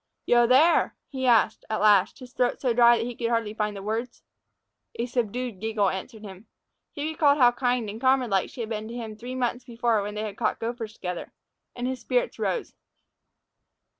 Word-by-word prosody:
"Yo 240 0 +4
there?" 290 +7 +4
he 260 -2 -2
asked, 225 -2 +3
at 220 - -1
last, 205 -3 +4
his 250 -2 -12
throat 245 -1 0
so 250 -3 +1
dry 235 0 +6
that 225 - -2
he 245 - -4
could 235 - -4
scarcely 230 -2 -1
find 210 -2 -2
the 195 - -8
words. 230 +3 -4 0.7
A 235 - -2
subdued 245 -2 -3
giggle 215 -2 +1
answered 215 +4 -7
him. 195 +1 -11 0.4
He 290 - -5
recalled 300 -2 +3
how 245 -3 +6
kind 245 -2 0
and 215 +3 -7
comrade 260 -3 +2
like 195 -1 +1
she 250 - -8
had 220 - -4
been 215 0 -4
to 230 - -8
him 225 -3 -6
three 245 +4 -7
months 245 -1 -1
before 235 -3 0
when 205 +1 -5
they 210 - -3
had 210 -1 -6
caught 230 - 0
gophers 225 -1 -4
together, 180 -4 -6 0.4
and 245 - -4
his 260 0 -3
spirits - - -1
rose. 475 - -2
235 Hz, 200 wpm, -26 LUFS, 215-250 Hz, 0.7 s, dry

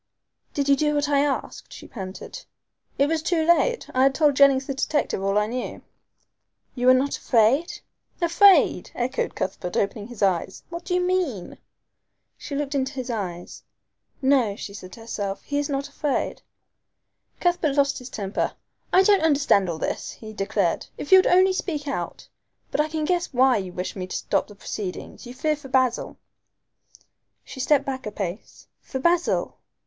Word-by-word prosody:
"Did 285 -2 0
you 280 - +6
do 300 +1 +1
what 290 0 +1
I 285 -1 +3
asked?" 285 -1 -2
she - - -10
panted. 195 - -8 0.5
"It 280 - +4
was 320 +1 0
too 325 -1 +1
late. 345 +9 +2
I 255 - +2
had 270 0 +4
told 295 -2 +3
Jennings 275 -1 +5
the 275 - -3
detective 280 -5 -1
all 195 +1 +1
I 210 - +3
knew." 245 +3 -5 0.9
"You 250 -1 -1
were 255 - +8
not 275 +2 +1
afraid?" 250 +8 +2 0.4
"Afraid!" 365 +3 +5
echoed 255 +2 -2
Cuthbert, 180 -1 -3
opening 205 +1 -1
his 235 -4 -5
eyes. 190 -1 0
"What 340 0 -7
do 360 - -1
you 360 - +2
mean?" 360 - -1 0.8
She 285 - -7
looked 285 0 -2
into 270 0 -1
his 255 -2 -4
eyes. 180 -6 -5 0.6
"No," 260 -7 +3
she 200 - -8
said 185 -2 -10
to 230 - -11
herself, 205 -3 -4
"he 285 0 -2
is 290 - -2
not 275 0 -2
afraid." 285 0 -2 1.0
Cuthbert 345 -5 +1
lost 280 -1 +2
his 250 0 -9
temper. 200 -1 -2 0.4
"I 375 - +6
don't 400 0 +4
understand 285 - +3
all 165 - -3
this," - - -3
he 215 -1 -10
declared, 195 -3 -1
"if 290 - -7
you 380 - +10
would - - +3
only 375 +1 +5
speak 310 -6 -3
out. 275 - -4 0.4
But - - +2
I 305 - 0
can 310 0 -2
guess 355 +1 0
why 260 -1 +4
you 190 -3 -4
wish 180 +1 -5
me 185 -2 -5
to - - -6
stop - - 0
the 205 - -13
proceedings 200 +3 -6
you 245 - -9
fear 305 +3 0
for 290 -2 -12
Basil!" 255 -2 +1 1.3
She - - -10
stepped 280 +1 +3
back 260 -3 -4
a - - -4
pace. 195 0 -6 0.2
"For 265 - -6
Basil?" 340 +5 +1
270 Hz, 180 wpm, -24 LUFS, 215-305 Hz, 1.3 s, you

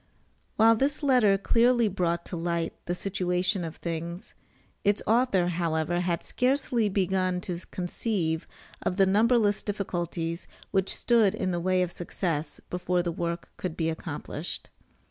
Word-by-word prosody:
While 225 +1 +6
this 280 +6 0
letter 245 -8 +5
clearly 235 +3 +3
brought 170 -3 -1
to - - -5
light 170 -1 -1
the 175 - 0
situation 180 0 0
of 165 -1 -5
things, 170 +1 -5 0.5
its 205 0 +2
author, 220 -6 +3
however, 165 -1 0
had 175 -1 -1
scarcely 250 -4 +1
begun 185 -2 +1
to 180 -2 -4
conceive 175 -3 -2 0.3
of 180 - -1
the 195 - +6
numberless 210 +1 +3
difficulties 175 -4 -3 0.2
which 190 -1 +1
stood 225 -5 +3
in 185 - -1
the 175 - -1
way 185 +1 +2
of 180 - -3
success 165 -4 -3
before 180 0 0
the 175 - -1
work 170 0 -4
could 175 -3 -4
be 165 -1 +1
accomplished. 160 0 -6
180 Hz, 145 wpm, -28 LUFS, 170-205 Hz, 0.5 s, While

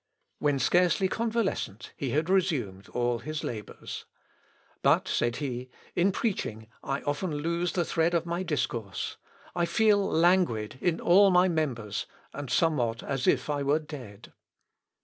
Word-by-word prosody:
When 145 -2 +2
scarcely 180 +7 +3
convalescent, 220 - -2
he 135 - -3
had 155 +6 0
resumed 150 - 0
all 120 -1 0
his 155 +3 -5
labours. 110 -4 -6 0.8
"But," - - +3
said 120 0 0
he, 130 -3 -4 0.3
"in 185 +3 +3
preaching 150 - -2 0.2
I 135 0 -3
often 145 +5 -1
lose 170 +3 -1
the 175 -2 +1
thread 165 +2 +1
of 170 0 +1
my 170 +1 -2
discourse. 120 - -2 0.4
I 175 -1 +2
feel 210 +2 +4
languid 165 - +2
in 170 -2 +1
all 195 +3 +6
my 180 0 +5
members, 130 - -2 0.3
and 145 -2 -6
somewhat 125 -5 +1
as 135 -2 -2
if - - +3
I 145 -1 -1
were 140 +2 +3
dead." 130 -9 -9
150 Hz, 145 wpm, -28 LUFS, 120-175 Hz, 0.8 s, all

